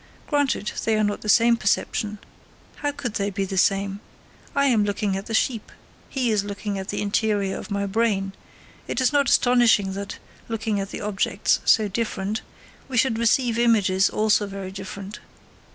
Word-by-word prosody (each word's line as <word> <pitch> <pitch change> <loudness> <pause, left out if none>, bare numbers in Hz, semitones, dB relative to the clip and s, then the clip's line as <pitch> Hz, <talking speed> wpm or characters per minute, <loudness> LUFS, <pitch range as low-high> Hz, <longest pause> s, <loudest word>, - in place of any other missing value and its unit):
Granted, 285 -8 0
they 225 - +2
are 215 - +2
not 205 0 -1
the 210 - -5
same 235 +2 +5
perception. 210 -1 -1 0.6
How 290 0 -1
could 245 -6 -5
they 200 -1 -1
be 195 0 -2
the 190 - -5
same? 195 +1 +1 0.6
I 280 0 +3
am 235 -6 +3
looking 205 -1 -1
at 195 +1 -5
the 225 - -2
sheep, 225 -1 0 0.4
he 255 -4 0
is 210 -2 +1
looking 200 0 -4
at 190 - -6
the - - -2
interior 205 -1 0
of - - -7
my 200 -1 -1
brain; 200 -2 0 0.5
it - - -2
is 260 +1 +2
not 280 -3 +3
astonishing 235 -6 +4
that, 200 0 -6 0.3
looking 225 -2 -2
at 195 0 -5
objects 205 0 0
so 215 -1 +4
different, 210 0 -2 0.5
we 255 - -3
should 230 -2 +2
receive 235 0 +2
images 200 -5 +3
also 215 -1 +2
very 195 -1 -6
different. 195 +2 -8
210 Hz, 170 wpm, -24 LUFS, 195-230 Hz, 0.6 s, same